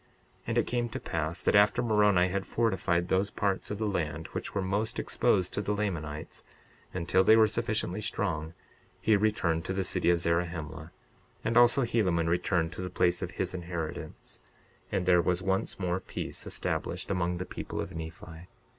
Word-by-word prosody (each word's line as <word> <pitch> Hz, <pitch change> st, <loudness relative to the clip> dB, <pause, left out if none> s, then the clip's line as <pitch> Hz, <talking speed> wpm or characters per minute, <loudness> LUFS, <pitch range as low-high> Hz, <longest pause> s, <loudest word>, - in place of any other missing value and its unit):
62:42 -, -, -34 dB, 0.4 s
And -, -, 0 dB
it -, -, +3 dB
came 120 Hz, 0 st, -1 dB
to -, -, -5 dB
pass 80 Hz, +1 st, -3 dB
that -, -, +3 dB
after 105 Hz, +4 st, +5 dB
Moroni 105 Hz, -5 st, +4 dB
had 95 Hz, +1 st, -1 dB
fortified 95 Hz, -6 st, +1 dB
those 95 Hz, +2 st, +2 dB
parts 100 Hz, -2 st, -1 dB
of 105 Hz, -, -3 dB
the 110 Hz, -, -1 dB
land 80 Hz, -5 st, -2 dB
which -, -, -5 dB
were 100 Hz, -, +1 dB
most 100 Hz, +4 st, -1 dB
exposed 90 Hz, -1 st, +1 dB
to 105 Hz, -, -1 dB
the 105 Hz, +1 st, -1 dB
Lamanites, 85 Hz, -6 st, -4 dB, 0.5 s
until 90 Hz, +1 st, +2 dB
they 110 Hz, +3 st, +7 dB
were 110 Hz, -1 st, +7 dB
sufficiently 105 Hz, -2 st, -1 dB
strong, 85 Hz, -7 st, -2 dB, 0.4 s
he 110 Hz, -, +3 dB
returned 95 Hz, -6 st, +1 dB
to 95 Hz, -, -2 dB
the 95 Hz, 0 st, 0 dB
city 90 Hz, -, +1 dB
of 85 Hz, -1 st, +4 dB
Zarahemla; 85 Hz, -2 st, -2 dB, 0.5 s
and 115 Hz, -, 0 dB
also 120 Hz, +2 st, +6 dB
Helaman 95 Hz, -8 st, +1 dB
returned 85 Hz, -1 st, +1 dB
to -, -, -6 dB
the 90 Hz, -, -4 dB
place 90 Hz, 0 st, +1 dB
of -, -, -3 dB
his -, -, -1 dB
inheritance; 85 Hz, -3 st, -6 dB, 0.5 s
and 90 Hz, -, 0 dB
there 90 Hz, -1 st, +5 dB
was 90 Hz, +1 st, 0 dB
once 95 Hz, +1 st, -1 dB
more 90 Hz, -1 st, 0 dB
peace -, -, -6 dB
established -, -, -3 dB
among 90 Hz, -2 st, 0 dB
the 90 Hz, -, -4 dB
people -, -, -6 dB
of 95 Hz, -, -4 dB
Nephi. 80 Hz, +1 st, -8 dB
90 Hz, 180 wpm, -29 LUFS, 85-105 Hz, 0.5 s, they